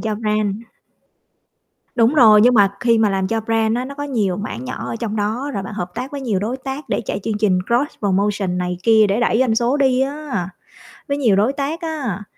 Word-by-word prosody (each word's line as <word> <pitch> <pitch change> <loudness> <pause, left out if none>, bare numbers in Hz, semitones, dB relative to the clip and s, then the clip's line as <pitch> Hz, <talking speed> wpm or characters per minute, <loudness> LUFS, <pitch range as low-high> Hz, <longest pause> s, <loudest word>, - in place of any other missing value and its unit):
cho 215 -1 -2
brand. 210 -2 -1 1.4
Đúng 240 +4 +3
rồi, 215 -6 +7
nhưng 245 +3 +5
mà 200 -3 +5
khi 230 -2 +3
mà 215 -2 +3
làm 190 -1 0
cho 225 0 -1
brand 225 0 0
á, 250 - -2
nó 280 +2 -7
có 290 - -5
nhiều 215 -10 -1
mảng 155 - -5
nhỏ - - -5
ở - - -4
trong 220 -2 -4
đó 220 +7 -2
rồi 195 - -2
bạn 200 +2 -7
hợp 180 -3 -4
tác 250 +3 -5
với 280 - -5
nhiều 225 -7 -1
đối 235 +5 -2
tác 270 +3 -6
để - - 0
chạy 200 - -3
chương 215 -2 -2
trình 195 -4 +2
cross 245 +5 0
promotion 195 -2 0
này 180 0 -3
kia 220 -1 +5
để 200 +4 0
đẩy 230 -1 +2
doanh 250 -3 +2
số 240 +5 +1
đi 265 -2 +2
á, 275 - -3 0.6
với 280 0 -1
nhiều 230 -8 +3
đối 220 +7 +2
tác 290 +5 -3
á. 275 - -4
225 Hz, 230 wpm, -19 LUFS, 205-260 Hz, 1.4 s, rồi